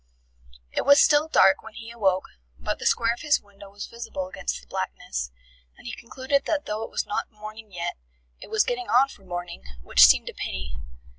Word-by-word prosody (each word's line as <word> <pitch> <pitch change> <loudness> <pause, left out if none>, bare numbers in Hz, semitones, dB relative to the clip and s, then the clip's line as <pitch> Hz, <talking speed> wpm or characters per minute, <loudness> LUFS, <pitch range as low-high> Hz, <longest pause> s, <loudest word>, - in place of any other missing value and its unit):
It - - 0
was 285 +1 +7
still 295 +1 +5
dark 195 -11 +5
when 220 -1 -12
he 230 0 -8
awoke, 190 -5 +1 0.3
but - - -3
the - - 0
square 230 0 +3
of 240 - -10
his 300 -2 +3
window 200 -1 -15
was 205 +1 -7
visible 230 -5 -6
against - - -4
the - - -18
blackness, 60 0 -4 0.5
and - - -17
he 240 - -5
concluded 265 +4 -1
that 300 -2 0
though 210 +1 -3
it 225 - -5
was - - -2
not 205 - -3
morning 215 0 -10
yet, 175 -1 -4 0.4
it - - -11
was 220 0 +3
getting 245 0 -3
on 260 +3 +5
for 205 - -14
morning, 175 - -6 0.2
which 60 - +3
seemed 60 0 +4
a - - -8
pity. 65 -1 -5
215 Hz, 205 wpm, -25 LUFS, 185-240 Hz, 0.5 s, was